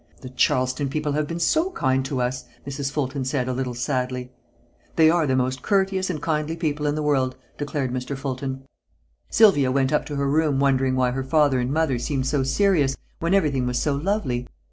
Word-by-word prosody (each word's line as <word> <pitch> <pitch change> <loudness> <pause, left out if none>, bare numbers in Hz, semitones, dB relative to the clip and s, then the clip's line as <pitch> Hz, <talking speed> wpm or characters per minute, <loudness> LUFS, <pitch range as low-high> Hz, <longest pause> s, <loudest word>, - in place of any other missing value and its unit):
"The 130 - -8
Charleston 130 +2 +1
people 150 +1 -2
have 150 +1 0
been 165 +2 -4
so 320 - +2
kind 130 - 0
to 135 -2 -2
us," 125 +1 -2 0.2
Mrs. 140 0 -3
Fulton 140 -2 -2
said, 130 -1 -1
a 130 - -1
little 125 -1 -3
sadly. 125 -1 -2 0.6
"They 160 0 +6
are 165 -3 +2
the 130 - +2
most 130 0 0
courteous 190 0 +1
and 165 -4 -2
kindly 155 +1 -1
people 150 -3 -1
in 145 - 0
the 155 - -2
world," 135 -3 +1 0.2
declared 145 -3 -2
Mr. 130 +2 -3
Fulton. 135 0 -4 0.7
Sylvia 160 - +5
went 135 +1 +1
up 150 - +1
to 145 - -5
her 140 0 0
room 150 -1 +2
wondering 135 -1 +2
why 125 -1 +2
her 135 +1 -2
mother 135 0 +2
and 125 +1 -1
father 150 -7 +1
seemed 130 +1 -2
so 140 +1 +1
serious, 145 -1 +2 0.2
when 170 +4 +1
everything 140 -9 +1
was 125 0 0
so 145 0 0
lovely. 140 - -1
140 Hz, 200 wpm, -23 LUFS, 130-155 Hz, 0.7 s, They